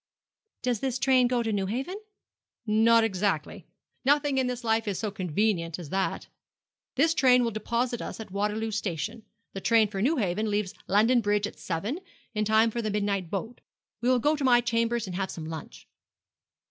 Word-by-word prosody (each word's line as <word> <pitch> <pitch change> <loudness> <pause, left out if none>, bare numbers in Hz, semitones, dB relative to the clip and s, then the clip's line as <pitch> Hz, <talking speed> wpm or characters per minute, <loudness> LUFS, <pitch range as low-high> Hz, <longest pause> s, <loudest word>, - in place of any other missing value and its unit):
'Does 245 -3 0
this 260 0 -1
train 255 -1 +4
go 245 -1 0
to 225 -1 -1
Newhaven?' 230 - -2 0.7
'Not 225 +1 +4
exactly. 195 -6 -1 0.4
Nothing 285 0 +3
in 260 - +1
this 250 0 -4
life 225 -1 +1
is 200 -3 -1
so 215 -2 -2
convenient 180 -2 -1
as 170 -5 -8
that. 190 0 -1 0.7
This 320 +5 +3
train 250 -5 +5
will 230 - 0
deposit 235 +3 -2
us - - -6
at 220 -4 -8
Waterloo 210 +3 -1
Station. 215 +2 -3 0.3
The 195 - -5
train 225 0 +4
for 195 -2 -4
Newhaven 220 - +1
leaves 205 -2 -1
London 225 +5 +4
Bridge 205 -1 +1
at - - -8
seven, 200 - -3 0.3
in 215 -1 0
time 220 +2 +4
for 235 - -2
the 215 - -2
midnight 200 -4 -1
boat. 225 +6 -5 0.4
We 245 - +1
will 255 - +4
go 295 +6 +2
to 290 - -4
my 245 -2 +6
chambers 230 -1 0
and 185 -2 -6
have 195 -1 -2
some 160 - -6
lunch.' 155 - -8
220 Hz, 180 wpm, -27 LUFS, 200-245 Hz, 0.7 s, my